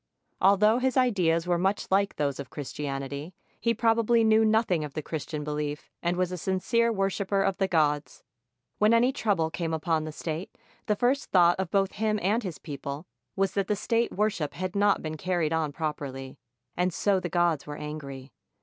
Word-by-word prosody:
Although 210 +4 +5
his 260 0 0
ideas 180 -10 +2
were 175 -1 +1
much 195 +2 -1
like 200 +1 +2
those 140 -2 -1
of 140 - -6
Christianity, 140 +2 -5 0.2
he 230 - +1
probably 230 0 +3
knew 220 0 +5
nothing 215 -7 +2
of 145 -2 -7
the 155 - -3
Christian 155 -1 -4
belief 150 0 -4
and 175 +1 0
was 185 -1 0
a 180 - -4
sincere 230 +7 +1
worshiper 195 -1 0
of 195 -1 0
the 195 - +1
gods. 150 -4 0 0.6
When 215 +2 +5
any 245 +3 +4
trouble 190 -11 0
came 165 -1 -2
upon 160 -1 0
the 155 - -5
state, 160 +3 -5 0.3
the 210 - +2
first 255 +6 +1
thought 175 -1 +5
of 190 -2 -1
both 195 0 +1
him 215 0 0
and 210 +6 +2
his 185 -8 -5
people 140 +1 -6 0.3
was 195 0 +1
that 200 -1 -1
the 210 - +1
state 230 +3 0
worship 205 -7 -1
had 185 +1 -4
not 205 0 +3
been 155 0 -4
car 180 +3 -1
ried 160 -2 +1
on 160 -2 0
properly, 140 -4 -5 0.4
and 180 +1 +1
so 195 +2 +1
the 175 - -4
gods 170 -4 +1
were 145 0 -6
angry. 140 -3 -7
180 Hz, 190 wpm, -27 LUFS, 155-205 Hz, 0.6 s, Although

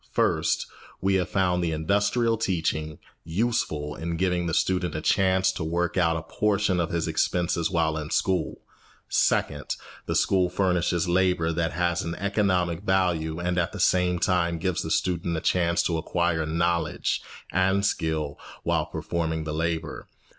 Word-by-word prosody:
First, - - +1 0.3
we 95 +1 +1
have 95 -2 +1
found 90 -2 +1
the 85 - 0
industrial 100 +8 +1
teaching 80 -7 -1 0.3
useful 80 -6 -1
in 85 +2 -4
giving 90 -1 0
the 80 - -2
student 90 -4 0
a - - -1
chance 95 +2 +3
to 90 - -5
work 85 +2 -1
out 85 -3 +2
a 80 - -5
portion 100 0 +1
of 85 -1 0
his 85 -1 -1
expenses 85 -2 0
while 80 -2 +1
in 75 0 -6
school. 95 +1 0 0.5
Second, - - +1 0.3
the - - -1
school 95 -2 +3
furnishes 90 -2 +1
labour 90 -2 +2
that 80 -1 -1
has 85 +1 0
an 85 +1 -4
economic 95 -4 0
value 90 -5 0
and 90 +1 0
at 85 - -1
the - - -6
same 90 -1 +3
time 85 -1 +1
gives 90 +1 -1
the 80 - -4
student 85 0 0
a - - 0
chance 85 0 +1
to 85 - 0
acquire 85 -1 0
knowledge 85 0 0 0.3
and 95 +2 +2
skill 80 -6 -1 0.2
while - - 0
performing 80 -2 -2
the 75 -1 -4
labour. 80 0 -3
85 Hz, 160 wpm, -26 LUFS, 80-95 Hz, 0.5 s, chance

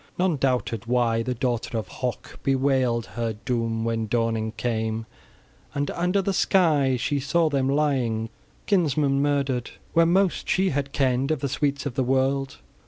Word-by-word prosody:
None 180 -4 +1
doubted 125 -4 -1
why 120 -2 +2
the 125 +2 -2
daughter 120 -2 -2
of 110 -4 -3
Hoc 125 +5 -5
bewailed 130 -3 +1
her 115 -1 -3
doom 115 -2 -1
when 115 -1 -1
dawning 115 -1 0
came, 110 -1 -2 0.7
and 145 0 -1
under 180 +3 0
the 195 - 0
sky 150 -10 +3
she 140 +4 -1
saw 155 +4 +2
them 135 -2 +1
lying, 130 -6 0 0.4
kinsmen 145 -7 +2
murdered, 140 -4 0 0.2
where 165 0 +5
most 190 +1 +1
she 190 0 +2
had 140 0 -2
kenned 135 -1 +1
of 155 -4 0
the 140 - 0
sweets 140 +1 -1
of 140 - -3
the 130 +1 0
world! 135 +1 0
135 Hz, 160 wpm, -25 LUFS, 120-145 Hz, 0.7 s, where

